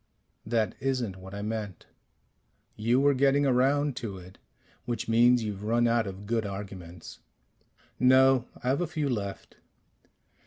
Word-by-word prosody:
"That 110 -3 0
isn't 125 -7 -2
what 95 +1 -10
I 100 - -5
meant 105 -4 -5 0.5
" - - -45 0.3
"You 115 +4 +1
were 140 +1 +4
getting 140 +2 +3
around 135 +2 +2
to 105 -5 -5
it 90 +1 -14 0.5
which 120 -3 -3
means 120 +1 +4
you've 105 -2 -5
run 120 +3 +2
out 115 -2 +1
of 95 +1 -8
good 115 +1 0
arguments." 95 -4 -8 0.8
"No. 130 0 +5 0.2
I've 130 +6 +1
a 175 - 0
few 155 -2 -2
left." 100 -5 -5
115 Hz, 145 wpm, -28 LUFS, 100-130 Hz, 0.8 s, No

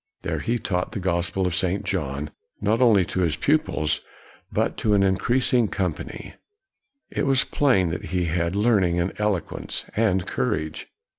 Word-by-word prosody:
There - - -2
he 120 +1 0
taught 90 -5 -2
the - - -3
gospel 90 +1 0
of 90 - 0
St. 95 +3 0
John, 75 -4 -3 0.3
not 110 +4 +1
only 105 -7 +5
to 95 - -3
his 85 -4 +2
pupils, 110 - +1 0.5
but - - 0
to 105 -1 +2
an 100 - +4
increasing 120 +5 +2
company. 90 -5 -4 0.8
It - - -1
was 135 -1 +3
plain 95 -12 +2
that 85 - -4
he 90 +2 -1
had 85 +2 -1
learning, 100 -5 +3
and 85 +2 -1
eloquence, 105 -5 -2
and 95 -5 +2
courage. 75 +4 -2
95 Hz, 155 wpm, -24 LUFS, 85-110 Hz, 0.8 s, only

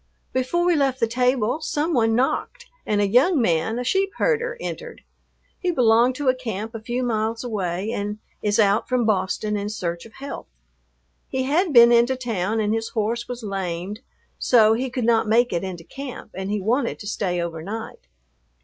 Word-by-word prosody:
Before 260 +7 0
we 355 -1 +4
left 270 -3 +1
the 230 - +3
table 250 +3 +1
some 315 +2 -1
one 225 -3 +3
knocked 255 +3 -1 0.2
and 210 -1 +1
a 205 - +3
young 270 - +4
man, 175 0 +1
a 245 - -2
sheep 385 +9 +1
herder, 475 0 0
entered. - - -7 0.6
He 365 - -1
belonged 245 -4 +4
to 285 0 -3
a 255 - +6
camp 225 -3 -5
a 225 - -5
few 240 +3 -2
miles 225 -1 -1
away 200 -3 -2
and 210 -1 -3 0.2
is 210 +1 +1
out 205 -1 +3
from 250 -2 +1
Boston 210 +1 0
in 205 0 -2
search 175 -3 -4
of 220 - -21
health. 275 +1 -7 0.8
He 260 0 -1
had 320 +6 +1
been 235 -2 +8
into 240 +2 +4
town 225 -4 -2
and 210 0 +1
his 225 0 -2
horse 230 +2 -2
was 245 -1 -6
lamed 195 0 -4 0.4
so 220 -3 +5
he 255 +3 -1
could 240 -1 -2
not 225 -2 +3
make 235 +1 +3
it 170 - -1
into 180 -3 -6
camp, 270 +1 -8
and 190 +1 -5
he 210 0 0
wanted 235 +6 0
to - - -10
stay 185 -4 -1
overnight. 170 +7 -6
225 Hz, 185 wpm, -23 LUFS, 205-255 Hz, 0.8 s, been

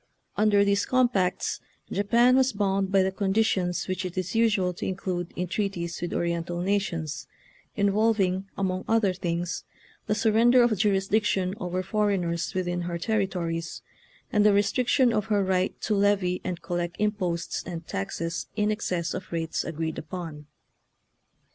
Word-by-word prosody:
Under 205 -1 +4
these 200 0 +1
compacts 240 -8 +1 0.3
Japan 235 +5 +4
was 265 -1 +3
bound 195 -1 0
by 195 -1 +4
the 190 - 0
conditions 190 -2 0
which 185 0 -2
it 185 0 -6
is 185 -1 -2
usual 210 -5 +2
to - - -6
include 180 -2 -3
in 180 - -1
treaties 175 -2 -3
with 175 - -3
Oriental 170 0 -1
nations, 170 -8 -2 0.5
involving, 200 -2 +1
among 185 -1 -1
other 220 -4 +3
things, 175 -1 -3 0.4
the 210 - +1
surrender 230 +3 +5
of 235 -2 +3
jurisdiction 195 -1 +1
over 180 0 -2
foreigners 190 -5 0
within 175 -1 -1
her 170 0 -3
territories 175 -5 -2 0.5
and 210 - +4
the 210 -1 +5
restriction 240 +5 +3
of 210 - 0
her 205 -2 +1
right 185 0 0
to 215 - 0
levy 200 -3 +2
and 175 -2 -4
collect 175 -1 -2
imposts 185 -5 -1
and 170 -2 -6
taxes 165 +13 -3
in 210 0 +1
excess 180 -6 -2
of 185 - -6
rates 165 -1 -2
agreed 160 -1 -3
upon. 160 -3 -7
190 Hz, 145 wpm, -26 LUFS, 175-210 Hz, 0.5 s, surrender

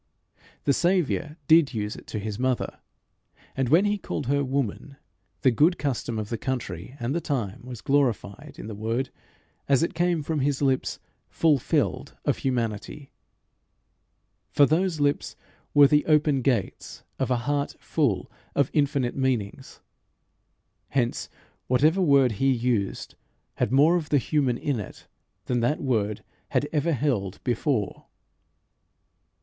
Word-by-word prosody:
The 140 - +3
Saviour 170 -3 0
did 155 -5 +5
use 105 -1 -2
it - - -13
to - - -5
his 105 +1 -4
mother; 130 -1 -1 0.8
and 135 -2 0
when 170 +8 +5
he 205 0 0
called - - -4
her 140 +3 +1
woman, 135 0 -2 0.5
the 130 - +4
good 155 +9 +3
custom 125 -5 -2
of 105 -1 -4
the 115 - -3
country 120 -4 -4
and 120 +3 -2
the 170 - -1
time 120 -11 -3
was 125 -2 -8
glorified 120 -9 0
in - - -8
the 110 - -6
word 115 +5 -2 0.6
as 140 +2 +4
it - - -1
came 170 -2 +1
from 155 +1 -1
his 140 0 0
lips 135 -2 0 0.3
fulfilled, 150 -5 +1
of - - +1
humanity; 120 +1 -3 1.4
for 145 - +5
those 165 +2 +1
lips 145 0 0 0.4
were 145 -1 +9
the 150 +2 +4
open 150 -3 +3
gates 120 -6 -2 0.2
of - - 0
a 125 - +2
heart 145 0 -1
full 115 - -1 0.2
of 140 -2 +2
infinite 140 -4 +1
meanings. 130 -2 -2 1.1
Hence 120 -3 -1 0.4
whatever 155 +9 +3
word 140 -7 +4
he 135 +6 +1
used 115 -5 -1 0.4
had - - 0
more 150 +6 +5
of 160 -3 -5
the 145 - +4
human 135 -2 +1
in 140 -3 -1
it 105 - -9 0.4
than 125 - 0
that 120 +6 +1
word 110 -6 -1 0.3
had 145 - +1
ever 155 +2 +1
held 115 -9 -1
before. 120 -3 -1
135 Hz, 145 wpm, -26 LUFS, 115-150 Hz, 1.4 s, were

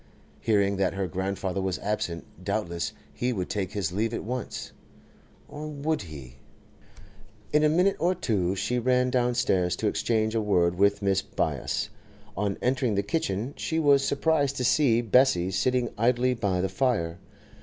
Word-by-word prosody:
Hearing 100 -3 +2
that 95 -1 0
her 95 -1 -1
grandfather 95 +2 -2
was 95 -2 -1
absent, 90 -5 -3 0.2
doubtless 85 0 -2 0.2
he 125 +1 -1
would 95 -7 -3
take 100 -3 -2
his 95 -5 -1
leave 110 +5 -1
at - - -4
once. 125 +3 -5 0.8
Or, 150 +1 -7
would 150 0 -2
he— 70 -8 -10 1.2
In 150 0 +4
a 155 - +5
minute 180 +5 +3
or 180 +3 +2
two 100 - 0
she 125 +5 -1
ran 125 +1 +2
downstairs 120 -8 +1
to 110 - -4
exchange 110 +1 0
a 115 - +1
word 90 -5 +2
with 100 +2 +2
Mrs. 100 -1 +1
Byass. - - -1 0.5
On 100 -1 -1
entering 125 -3 +1
the 100 - +1
kitchen 120 - -2
she 160 - -2
was 140 -3 +4
surprised 140 0 +1
to 125 - -1
see 125 -2 +3
Bessie 115 -6 +3
sitting 125 +5 +1
idly 125 +2 +3
by 100 -6 0
the 95 - +1
fire. 95 -7 0
110 Hz, 160 wpm, -27 LUFS, 95-130 Hz, 1.2 s, a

